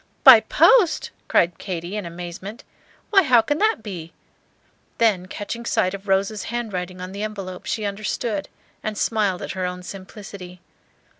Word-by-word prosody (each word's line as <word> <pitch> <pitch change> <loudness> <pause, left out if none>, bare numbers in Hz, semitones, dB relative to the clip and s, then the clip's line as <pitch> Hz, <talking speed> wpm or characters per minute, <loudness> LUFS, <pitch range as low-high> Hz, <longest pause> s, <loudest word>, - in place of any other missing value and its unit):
"By - - +11
post!" 410 -10 +4 0.2
cried 170 0 +2
Katy, 175 0 -5
in 205 -4 -3
amazement; 175 +6 -8 0.5
"why, 395 -2 +7
how 255 -8 +5
can 290 +7 -1
that 435 - +2
be?" 175 -6 -7 0.8
Then 205 -6 +2
catching 210 +5 -6
sight 185 -5 +1
of 200 +1 -8
Rose's 195 +2 +1
handwriting 190 -6 -4
on 185 +1 -6
the 200 +1 -6
envelope, 195 -4 -6
she 215 - -2
understood, 205 0 -3 0.3
and 215 -1 -4
smiled 205 -6 0
at - - -4
her 185 -1 -2
own 180 0 -6
simplicity. 190 -1 -9
200 Hz, 150 wpm, -23 LUFS, 180-220 Hz, 0.8 s, By